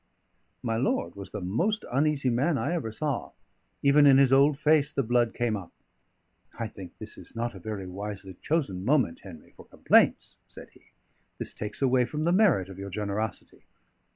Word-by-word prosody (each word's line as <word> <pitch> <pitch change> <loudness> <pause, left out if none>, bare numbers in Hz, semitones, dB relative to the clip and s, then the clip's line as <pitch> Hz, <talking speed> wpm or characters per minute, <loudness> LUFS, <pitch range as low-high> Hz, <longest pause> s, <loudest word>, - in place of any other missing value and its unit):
My 115 -1 -1
lord 115 -8 -1
was 100 -1 -8
the - - -6
most 175 - -1
uneasy 140 -1 +1
man 140 +6 +1
I 120 +8 -1
ever 150 -10 -3
saw; 145 +5 -3 0.5
even 145 +1 +6
in 135 -1 +7
his 135 -1 +5
old 140 +1 +5
face 150 -1 +3
the 140 -2 -1
blood 120 0 +2
came 120 -2 0
up. 95 -4 -8 0.9
"I 115 - -3
think 95 -3 -11
this - - -10
is - - -15
not 120 +1 -2
a 95 - -10
very 100 0 -5
wisely 95 +1 -7
chosen 135 - -1
moment, 125 - +1
Henry, 85 -6 -13
for - - -14
complaints," - - +2
said - - -13
he. - - -23 0.5
"This - - -5
takes 105 +6 -5
away 130 -1 +3
from 150 +4 -4
the 170 - +2
merit 180 - +3
of 95 -1 -11
your 100 0 -6
generosity." 105 +2 -4
120 Hz, 180 wpm, -27 LUFS, 100-145 Hz, 0.9 s, in